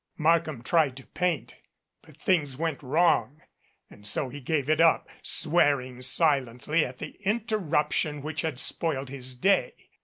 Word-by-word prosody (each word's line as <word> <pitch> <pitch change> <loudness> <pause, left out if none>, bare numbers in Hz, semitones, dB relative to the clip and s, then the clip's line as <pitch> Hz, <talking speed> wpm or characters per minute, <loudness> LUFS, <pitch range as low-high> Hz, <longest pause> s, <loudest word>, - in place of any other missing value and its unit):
Markham 160 -5 +1
tried 150 -4 +2
to 135 - -11
paint 165 -10 -2 0.4
but - - -19
things 150 -8 0
went 160 -2 -2
wrong 150 0 +1 0.4
and 105 0 -12
so 130 +6 -1
he 145 +3 -9
gave 145 +1 -1
it 155 +1 +3
up, 165 -1 +4
swearing 145 -6 +2
silently 140 +1 +1
at 125 0 -6
the - - -9
interruption 170 -9 0
which 155 +1 -3
had 155 -6 -3
spoiled 140 -5 -2
his 130 -2 -5
day. 195 +11 +2
150 Hz, 145 wpm, -27 LUFS, 130-165 Hz, 0.4 s, up